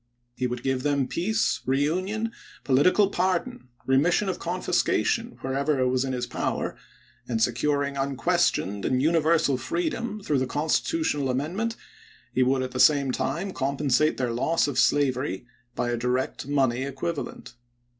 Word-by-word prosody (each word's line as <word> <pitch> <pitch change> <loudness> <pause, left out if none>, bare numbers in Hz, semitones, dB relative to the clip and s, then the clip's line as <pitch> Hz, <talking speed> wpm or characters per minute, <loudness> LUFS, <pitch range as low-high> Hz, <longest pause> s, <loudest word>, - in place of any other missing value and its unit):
He 125 - -1
would 125 0 -5
give 130 -1 0
them 140 -1 +1
peace, 210 - 0
reunion, 185 - 0 0.3
political 180 +9 +4
par 185 0 +2
don, 250 - -9 0.2
remission 165 +9 +2
of 185 - -3
confiscation 235 +1 0
wherever 140 +2 0
it 130 0 +2
was 130 0 +1
in 135 - -2
his 125 -1 -2
power, - - -2 0.5
and 115 -2 -1
securing 140 +4 0
unquestioned 125 -7 0
and 130 - +1
universal 160 -1 +3
freedom 180 - -2
through 145 -6 +1
the 130 - -1
constitutional 150 - 0
amendment, 175 - -1 0.6
he 130 - +2
would 130 +1 +2
at 130 - -4
the 130 - -4
same 140 -2 +5
time 195 +8 -2
compensate 140 +2 +1
their 125 -2 -1
loss 145 +9 +1
of 145 - -1
slavery 130 -7 +1 0.3
by 120 - -1
a 120 - -1
direct 125 +2 -2
money 135 -4 +1
equivalent. 140 0 -5
140 Hz, 145 wpm, -26 LUFS, 130-170 Hz, 0.6 s, same